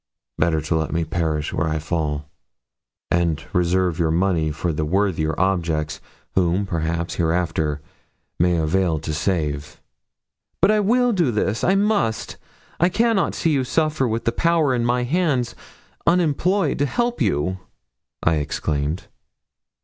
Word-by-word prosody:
Better 80 Hz, -1 st, +2 dB
to 80 Hz, -, -1 dB
let 80 Hz, -1 st, -1 dB
me 85 Hz, +1 st, 0 dB
perish 80 Hz, -4 st, -1 dB
where 85 Hz, -, 0 dB
I 80 Hz, -, -1 dB
fall; 75 Hz, -2 st, -2 dB, 0.8 s
and 85 Hz, -3 st, +1 dB
reserve 90 Hz, 0 st, +1 dB
your 80 Hz, -2 st, +2 dB
money 85 Hz, -1 st, +1 dB
for 80 Hz, +2 st, -2 dB
the 75 Hz, -, -1 dB
worthier 80 Hz, -2 st, 0 dB
objects 85 Hz, -5 st, 0 dB, 0.3 s
whom, 90 Hz, +2 st, +2 dB
perhaps, 85 Hz, -1 st, -2 dB
hereafter 80 Hz, -3 st, 0 dB, 0.6 s
may 85 Hz, 0 st, +3 dB
avail 80 Hz, +1 st, +1 dB
to 75 Hz, 0 st, -4 dB
save.' 75 Hz, -3 st, -2 dB, 0.8 s
'But -, -, +5 dB
I 215 Hz, -, +3 dB
will 245 Hz, +4 st, +3 dB
do 175 Hz, -8 st, +2 dB
this. 110 Hz, -1 st, -1 dB
I 190 Hz, -, +3 dB
must. 200 Hz, -, 0 dB, 0.4 s
I 175 Hz, -, +4 dB
cannot 225 Hz, -1 st, +1 dB
see 165 Hz, -, +1 dB
you 135 Hz, -3 st, +2 dB
suffer 155 Hz, 0 st, +1 dB
with 115 Hz, 0 st, -2 dB
the 115 Hz, -, +2 dB
power 160 Hz, +1 st, +2 dB
in 120 Hz, -2 st, 0 dB
my 125 Hz, +1 st, +1 dB
hands 140 Hz, -3 st, 0 dB, 0.5 s
unemployed 180 Hz, +3 st, +2 dB
to 145 Hz, -, +2 dB
help 240 Hz, -, -1 dB
you,' 95 Hz, -, 0 dB, 0.6 s
I 80 Hz, -1 st, +3 dB
exclaimed. 75 Hz, +2 st, -2 dB
90 Hz, 140 wpm, -22 LUFS, -, 0.8 s, But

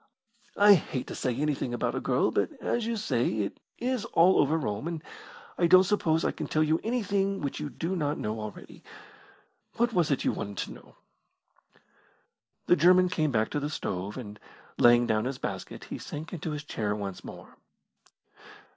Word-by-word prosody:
I 205 Hz, 0 st, +8 dB
hate 145 Hz, -7 st, -1 dB
saying 125 Hz, 0 st, -2 dB
anything 140 Hz, -4 st, -1 dB
about -, -, -1 dB
a -, -, -1 dB
girl, -, -, +1 dB
but, -, -, +1 dB
as 235 Hz, -2 st, -1 dB
you 230 Hz, -1 st, -1 dB
say, 160 Hz, -, 0 dB
it 100 Hz, -, -4 dB, 0.2 s
is 250 Hz, -2 st, -1 dB
all 180 Hz, +3 st, +4 dB
over 150 Hz, +3 st, +3 dB
Rome, 110 Hz, -2 st, -3 dB
and 165 Hz, -2 st, -4 dB, 0.6 s
I 170 Hz, -, +4 dB
don't 185 Hz, +2 st, +8 dB
suppose 170 Hz, -5 st, +1 dB
I -, -, +2 dB
can -, -, -5 dB
tell 155 Hz, -, +2 dB
you 155 Hz, +1 st, +2 dB
anything 200 Hz, -4 st, 0 dB
which 140 Hz, -, -3 dB
you 150 Hz, -1 st, -4 dB
do 170 Hz, +6 st, -3 dB
not 150 Hz, -3 st, -1 dB
know 110 Hz, +1 st, -3 dB
already. 105 Hz, -1 st, -9 dB, 1.0 s
What 240 Hz, 0 st, +2 dB
was 175 Hz, -5 st, +2 dB
it 140 Hz, -, 0 dB
you -, -, +2 dB
wanted 100 Hz, -1 st, -5 dB
to -, -, -11 dB
know?" -, -, -14 dB, 1.7 s
The -, -, +5 dB
German 180 Hz, +3 st, +5 dB
came 155 Hz, -4 st, 0 dB
back 110 Hz, -4 st, 0 dB
to 145 Hz, -, -1 dB
the 145 Hz, +1 st, -3 dB
stove, 100 Hz, -7 st, -4 dB
and, 105 Hz, -5 st, -8 dB, 0.4 s
laying 120 Hz, 0 st, +6 dB
down 110 Hz, -1 st, +1 dB
his 130 Hz, 0 st, -3 dB
basket, -, -, -6 dB
he -, -, -7 dB
sank 155 Hz, +4 st, -7 dB
into 165 Hz, -2 st, -4 dB
his 150 Hz, -1 st, -4 dB
chair 105 Hz, -8 st, -2 dB
once 100 Hz, -3 st, -6 dB
more. -, -, -11 dB
150 Hz, 180 wpm, -28 LUFS, 120-185 Hz, 1.7 s, I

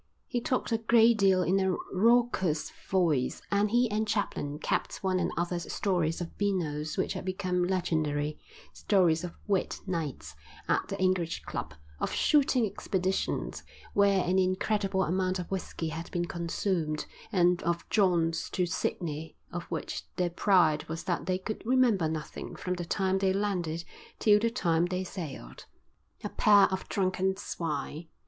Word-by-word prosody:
He 240 Hz, -, -2 dB
talked 255 Hz, 0 st, -1 dB
a 225 Hz, -, +2 dB
great 230 Hz, 0 st, +5 dB
deal 190 Hz, -2 st, +4 dB
in 190 Hz, +3 st, +2 dB
a 190 Hz, -1 st, +1 dB, 0.2 s
raucous 200 Hz, -6 st, +2 dB, 0.2 s
voice, 160 Hz, -9 st, +1 dB
and 205 Hz, +1 st, +3 dB
he 240 Hz, +3 st, +3 dB
and 215 Hz, +1 st, 0 dB
Chaplin 200 Hz, -8 st, -1 dB
capped 155 Hz, -, -2 dB
one 185 Hz, -1 st, +1 dB
another's 175 Hz, 0 st, -2 dB
stories 175 Hz, -5 st, 0 dB
of 175 Hz, -1 st, -6 dB
beanos 155 Hz, -7 st, -1 dB
which -, -, 0 dB
had -, -, -5 dB
become 185 Hz, -1 st, -1 dB
legendary, 155 Hz, -5 st, 0 dB, 0.3 s
stories 175 Hz, -5 st, +2 dB
of 175 Hz, -, -6 dB
"wet" 200 Hz, -3 st, 0 dB
nights 150 Hz, -, -4 dB, 0.3 s
at -, -, +1 dB
the -, -, -5 dB
English 185 Hz, -3 st, 0 dB
Club, 80 Hz, -2 st, -5 dB, 0.2 s
of -, -, -1 dB
shooting 270 Hz, -5 st, +3 dB
expeditions 190 Hz, -2 st, -2 dB, 0.3 s
where 200 Hz, -2 st, +4 dB
an 185 Hz, +2 st, +2 dB
incredible 190 Hz, +1 st, +1 dB
amount 185 Hz, +2 st, 0 dB
of 180 Hz, 0 st, -6 dB
whisky 180 Hz, -3 st, -3 dB
had 165 Hz, +2 st, -6 dB
been 175 Hz, -1 st, -1 dB
consumed, 170 Hz, -2 st, -2 dB, 0.3 s
and 180 Hz, -3 st, +3 dB
of 170 Hz, 0 st, -1 dB
jaunts 175 Hz, -5 st, +2 dB
to 180 Hz, -, 0 dB
Sydney 160 Hz, -2 st, -3 dB
of 175 Hz, 0 st, -5 dB
which -, -, -5 dB
their 180 Hz, -1 st, 0 dB
pride 170 Hz, -5 st, +3 dB
was 165 Hz, +1 st, -4 dB
that 180 Hz, -1 st, -2 dB
they 185 Hz, 0 st, +1 dB
could 215 Hz, +3 st, -5 dB
remember 230 Hz, -8 st, +3 dB
nothing 155 Hz, -1 st, -5 dB
from 180 Hz, -, -3 dB
the 175 Hz, -1 st, -4 dB
time 190 Hz, +2 st, +1 dB
they 190 Hz, -1 st, +2 dB
landed 180 Hz, -5 st, -1 dB, 0.3 s
till 210 Hz, -1 st, +5 dB
the 230 Hz, +2 st, +1 dB
time 175 Hz, -7 st, +1 dB
they 180 Hz, +1 st, -2 dB
sailed. 145 Hz, -, -7 dB, 0.6 s
A -, -, -2 dB
pair 205 Hz, -1 st, +6 dB
of 190 Hz, -, -4 dB
drunken 190 Hz, 0 st, 0 dB
swine. 160 Hz, -4 st, -4 dB
185 Hz, 155 wpm, -29 LUFS, 165-200 Hz, 0.6 s, pair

